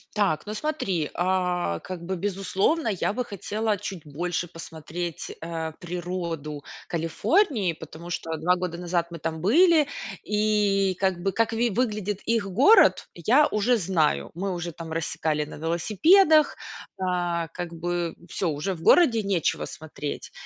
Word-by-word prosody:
Так, 200 -7 +1
ну 210 - -5
смотри, 210 - -2
а, 180 - 0
как 180 -2 -7
бы 190 +1 -2
безусловно, 195 - 0
я 200 -1 -1
бы 250 +3 -1
хотела 210 0 -2
чуть 185 -4 -7
больше 175 +4 -3
посмотреть, 165 0 -6
э, 165 -1 -4
природу 170 -4 -5 0.2
Калифорнии, 195 - +1
потому 160 +1 -10
что 165 -1 -3
2 175 +4 +2
года 180 -2 -3
назад 175 -1 -1
мы 170 - -7
там 160 0 -3
были 310 - +5 0.4
и 210 -2 +2
как 190 -3 0
бы 195 - +1
как 230 +2 +1
ви 235 +1 +1
выглядит 210 -3 -1
их 230 -2 +1
город, 280 - +5
я 250 - +4
уже 220 +3 +2
знаю. 160 - +1
Мы 190 +3 -3
уже 175 -1 -4
там 165 0 -8
рассекали 155 -2 -1
на 150 - -10
велосипедах. 295 - +4 0.4
А 175 -2 -1
как 175 0 -6
бы 170 0 -2
всё: 180 - -1
уже 155 +6 -2
в 165 - -10
городе 240 -11 +5
нечего 195 -5 0
смотреть. 150 -2 -6
180 Hz, 145 wpm, -25 LUFS, 165-210 Hz, 0.4 s, были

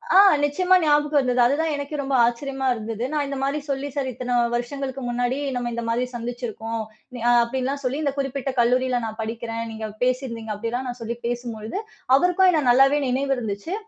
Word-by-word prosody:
அ - - +9 0.2
நிச்சியமா 360 +6 +3
ஞாபகம் 295 -1 +3
வந்தது. 250 -1 0
அது 270 - +3
தான் 320 -1 0
எனக்கே 285 +1 -4
ரொம்ப 270 -1 -1
ஆச்சரியமா 265 +3 -2
இருந்தது. 225 +1 -4
நான் 295 -1 +1
இந்த 275 -1 -4
மாரி 280 +2 0
சொல்லி 275 +1 -1
சார் 275 -2 -1
இத்தனை 250 0 -2 0.2
வருஷங்களுக்கு 265 +2 -4
முன்னாடி 245 +2 0 0.2
நம்ம 245 -1 -2
இந்த 235 - -3
மாரி 240 +2 +1
சந்திச்சிருக்கோம். 230 -1 -4 0.4
ந - - -6 0.2
அப்டின்லாம் 265 +3 -2
சொல்லி, 260 +3 -1
இந்தக் 280 -1 -1
குறிப்பிட்ட 270 0 -2
கல்லூரியில 250 +1 +2
நான் 220 0 -6
படிக்கிறேன். 230 +1 -4
நீங்கப் 220 -1 -6
பேசி 255 +1 +1
இருந்தீங்க. 225 -2 -5
அப்டிலாம் 240 +5 -3
நான் 245 0 -6
சொல்லிப் 235 +1 -5
பேசும்போழுது, 235 - -4 0.4
அவருக்கும் 360 +3 +4
என்ன 310 -3 +1
நல்லாவே 270 +4 +5
நினைவு 270 +2 +1
இருந்துச்சு. 220 - -4
250 Hz, 180 wpm, -23 LUFS, 235-280 Hz, 0.4 s, அ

